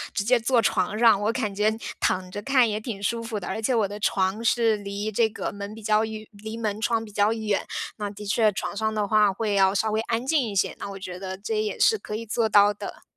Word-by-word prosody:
直 200 - 0
接 245 +3 +3
坐 235 +2 +2
床 200 0 +1
上， 225 -3 +5
我 215 +2 +1
感 225 -5 -2
觉 210 +2 +2 0.3
躺 185 0 0
着 205 - -5
看 255 +1 +3
也 210 -1 -2
挺 215 -3 -6
舒 230 +3 0
服 225 -2 -4
的， 185 - -7
而 205 +4 -3
且 245 +3 +1
我 215 -4 +2
的 205 +1 -7
床 195 +2 0
是 225 -1 +3
离 205 +1 -4
这 220 +2 +2
个 215 - -4
门 200 +1 -7
比 225 - -11
较 215 +1 +3
远 220 -1 -5
离 220 +2 -8
门 215 -2 -3
窗 225 -1 0
比 210 - -12
较 205 +1 +2
远。 215 -3 -1 0.3
那 205 -1 -3
的 210 +1 -9
确 215 +1 +3
床 200 - -4
上 220 +1 0
的 210 -1 0
话 210 -1 +4
会 210 +1 -2
要 195 0 +3
稍 220 +2 +1
微 215 +1 +1
安 230 +2 -2
静 300 +1 +2
一 220 -5 -4
些， 190 - +1
那 - - -5
我 195 - -7
觉 185 -1 -7
得 190 0 -5
这 215 +2 -2
也 210 -2 -3
是 440 - +4
可 210 - -6
以 230 +1 -5
做 225 +1 0
到 205 0 +6
的。 205 - -8
215 Hz, 285 characters per minute, -25 LUFS, 200-225 Hz, 0.3 s, 到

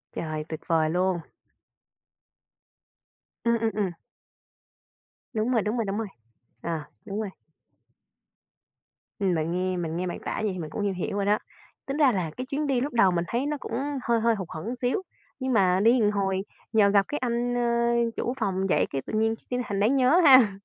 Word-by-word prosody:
Trời, 155 -1 -3
tuyệt 160 - -5
vời 160 -2 +2
luôn. 180 +1 +1 2.2
Ừm, 235 0 +2
ừm, 225 0 +1
ừm. 200 -4 0 1.4
Đúng 220 +3 0
rồi, 230 -4 +3
đúng 215 +3 -1
rồi, 225 - 0
đúng 195 +2 -2
rồi. 225 - -2 0.5
Ờ, - - -4 0.3
đúng 205 +1 -4
rồi. 210 -3 -3 1.9
Ừm, 190 -3 +2
mình 160 +1 -1
nghe 185 +1 -1
mình 165 -1 -3
nghe 180 - -2
bạn 175 - -4
tả - - -2
vậy 210 - +1
thì 185 - -6
mình 155 -3 -5
cũng - - -4
hiểu 185 +2 -3
rồi 200 - 0
đó. 210 +1 +3 0.5
Tính 275 +2 -3
ra 280 -4 +5
là 180 -6 -2
cái 255 - -3
chuyến 285 +2 -2
đi 260 -3 +1
lúc 285 +3 -2
đầu 195 -6 +5
mình 175 0 0
thấy 240 +4 -1
nó 300 0 -1
cũng - - -7 0.3
hơi 235 -1 +2
hơi 230 0 +3
hụt 190 -4 -5
hẫng 215 +11 -5
xíu, 250 +10 0 0.4
nhưng 260 0 -1
mà 185 -4 +4
đi 240 +2 +5
một 210 -1 +3
hồi 195 -2 0 0.3
nhờ 210 -2 +5
gặp 200 -1 +4
cái 295 - -2
anh, 245 -1 -1
ơ, 235 -1 +2
chủ 245 - -1
phòng 190 -3 0
vậy - - +3
cái 135 - -2
tự - - -7
nhiên 225 +1 +2
cái 250 - -1
thành 200 - -1
đáng 220 +7 +3
nhớ 270 +7 +5
ha. 255 -8 +7
215 Hz, 200 wpm, -26 LUFS, 185-240 Hz, 2.2 s, ha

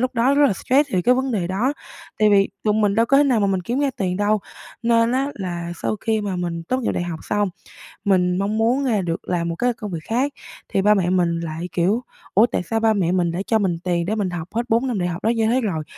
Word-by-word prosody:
lúc 255 +1 -1
đó 255 +4 +3
rất 290 0 +5
là 220 - +2
stress 275 +7 +1
thì 180 - +1
cái 250 +1 +4
vấn 260 0 -1
đề 185 -5 -1
đó 215 +10 0 0.5
tại 215 -1 +4
vì 195 -1 +4 0.2
tụi 210 -1 +2
mình 210 -2 +2
đâu 230 +2 +3
có 275 - +4
thể 290 - +5
nào 245 -6 +2
mà 200 - +2
mình 190 -1 0
kiếm 240 +9 -2
ra 280 -2 +1
tiền 180 -2 -1
đâu. 205 +1 +1 0.4
Nên 230 0 +3
á 270 +2 +1
là 175 -3 -4
sau 215 - -1
khi 220 -1 0
mà 200 -3 -3
mình 170 -2 -3
tốt 255 +10 -1
nghiệp 240 - -1
đại - - -2
học 170 -2 -5
xong, 205 -1 0 0.6
mình 180 -2 +2
mong 205 +3 -1
muốn, 245 +5 +2
à, 215 -6 +1
được 170 0 -4
làm 170 -1 0
một 165 - -3
cái 245 +6 +1
công 210 -3 -7
việc 165 -2 -5
khác 260 +5 -1 0.4
thì 195 - +1
ba 210 +2 +5
mẹ 180 -3 +1
mình 175 -2 +1
lại, 165 +1 -5
kiểu, 195 +8 +1 0.3
ủa 215 +5 +6
tại 180 - -2
sao 225 +5 -1
ba 220 -1 +3
mẹ 180 -4 +1
mình 180 -1 +2
đã 175 - -3
cho 220 -1 +2
mình 180 -4 0
tiền 175 -2 0
để 215 +4 -1
mình 200 -4 -1
học 175 -2 -5
hết 235 - +2
4 235 +4 +2
năm 230 -6 -1
đại 175 - 0
học 170 - -6
đó 225 - +2
như 225 -1 +1
thế 250 +3 +2
rồi, 180 -9 -2
205 Hz, 280 wpm, -21 LUFS, 180-235 Hz, 0.6 s, ủa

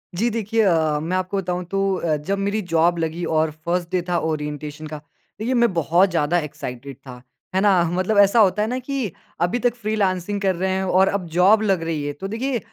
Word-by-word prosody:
जी, 225 +7 +1
देखिए 225 0 0
अ, 160 -6 +2
मैं 170 +5 -1
आपको 185 +1 -2
बताऊँ 180 -1 -2
तो 195 0 +1
अ, 165 -4 0
जब 190 +7 -2
मेरी 200 +2 -1
जॉब 170 -1 +2
लगी 165 +1 -2
और 160 -1 +1
फर्स्ट 175 0 -1
डे 185 -1 +1
था 175 - +1
ओरिएंटेशन 150 -1 -4
का, 155 0 -6 0.4
देखिए 235 +4 -1
मैं 235 -4 +3
बहुत 170 +3 +3
ज़्यादा 165 +1 +1
एक्साइटेड 140 -3 -7
था। 130 -2 -12 0.3
है 190 - +3
ना? 195 -4 +4
मतलब 185 +4 0
ऐसा 200 +3 +5
होता 200 -1 +4
है 215 - +1
ना 250 +3 -2
कि 260 -5 -3 0.3
अभी 175 +8 +1
तक 245 -1 +1
फ्रीलांसिंग 205 -3 -1
कर 190 -2 +1
रहे 190 +2 -1
हैं 190 0 0
और 190 +1 +3
अब 200 -2 -1
जॉब 195 +5 +5
लग 195 -6 +1
रही 160 -3 -2
है, 145 - -3
तो 170 +7 -6
देखिए 240 +4 -2
185 Hz, 215 wpm, -22 LUFS, 160-205 Hz, 0.4 s, ऐसा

